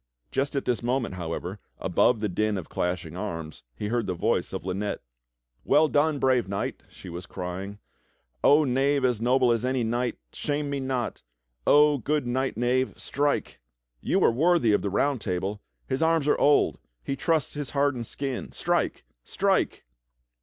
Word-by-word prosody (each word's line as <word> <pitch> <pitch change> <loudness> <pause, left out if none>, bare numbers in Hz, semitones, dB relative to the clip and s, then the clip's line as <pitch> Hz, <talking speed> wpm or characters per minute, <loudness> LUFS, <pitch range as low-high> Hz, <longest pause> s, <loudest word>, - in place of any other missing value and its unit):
Just 140 +1 -1
at 140 - -1
this 125 - 0
moment, 120 -2 -1
however, 90 +2 -5 0.2
above 120 -3 +2
the 105 - +1
din 105 +2 0
of 90 - -6
clashing 90 -2 -2
arms, 85 -5 -5
he 105 - -4
heard 120 0 0
the 90 - -1
voice - - 0
of - - -5
Lynette. 95 +2 -3 0.3
" - - -57
Well 155 +1 +4
done, 150 +1 +2
brave 130 -5 +2
knight! 100 0 -3
" - - -30
she - - -13
w'as 85 +1 -7
crying. 95 +2 -5 0.3
" - - -44
Oh 150 +2 +6
knave 135 +1 +2
as 120 -3 +1
noble 125 +1 +3
as 115 0 +1
any 130 -1 0
knight, 120 +2 -1 0.2
shame 145 -1 -2
me 140 - -1
not! 130 -2 -2 0.5
Oh 150 -1 +6
good 145 +2 0
knight 130 +1 -1
knave, 125 +2 0
strike! 145 +1 -1 0.4
You - - +1
are - - +6
worthy 155 -3 +3
of - - +3
the 100 - -1
Round 130 +5 +1
Table! 95 +3 -2 0.2
His 130 - -2
arms 160 -2 +2
are - - +4
old; 145 0 +4 0.2
he 135 - -2
trusts 160 +1 0
his 145 -3 -4
hardened 140 -5 0
skin. 135 -3 -4
Strike! - - -1 0.2
Strike!" - - 0
125 Hz, 175 wpm, -26 LUFS, 100-140 Hz, 0.5 s, Oh